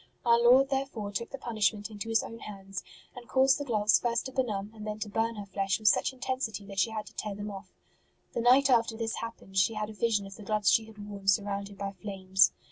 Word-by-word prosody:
Our 235 0 +5
Lord 255 +3 +6
therefore 265 -7 -2
took 230 +3 -3
the 275 - -6
punishment 220 -3 -1
into 210 +2 -6
His 225 - +2
own 230 - -8
hands, 195 -2 -7 0.3
and 245 -1 -10
caused 265 +3 +4
the - - -2
gloves 215 -4 +3
first 235 -1 0
to 260 - -5
benumb 215 -6 -2
and 215 -1 -8
then 210 0 -3
to 215 -1 -5
burn 225 +2 0
her 205 -1 -6
flesh 195 -1 -1
with 215 -1 +4
such - - +2
intensity 255 -6 -3
that 195 -1 -5
she 185 - +3
had 215 -1 -4
to - - -13
tear 210 -2 -4
them 205 +1 -5
off. 195 -1 -9 0.6
The - - -1
night 255 +3 +6
after 230 -3 +3
this 225 -1 -2
happened 210 -4 -4
she 195 +4 +2
had 215 0 -3
a - - -10
vision 210 -2 +1
of 195 0 -10
the - - -11
gloves 210 -1 +2
she 225 - +3
had 210 -2 -11
worn 200 -1 -9
surrounded 200 0 0
by 195 0 -3
flames. 190 -1 +2
215 Hz, 240 wpm, -29 LUFS, 200-235 Hz, 0.6 s, Lord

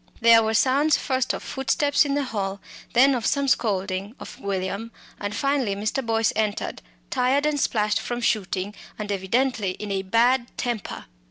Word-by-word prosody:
There 230 -1 +7
were 220 0 0
sounds 280 +6 +3
first 260 -3 0
of - - -5
footsteps 285 +2 +1
in 280 -1 0
the 290 - +1
hall, 200 -5 -3 0.3
then 270 +3 +6
of 245 -3 -2
some 280 +4 +1
scolding 200 -3 0
of - - -10
William, 200 +3 -3 0.3
and 205 +1 -4
finally 275 -7 0
Mr. 215 +6 -2
Boyce 225 -1 +1
entered, 215 -1 -2 0.3
tired 265 +3 +2
and 300 -1 +1
splashed 210 -5 +1
from 240 0 -3
shooting, 205 -4 -1 0.2
and 210 -1 -4
evidently 205 +1 0
in 205 +2 -6
a 195 -1 0
bad 235 +5 +2
temper. 240 -4 -4
225 Hz, 165 wpm, -24 LUFS, 205-265 Hz, 0.3 s, There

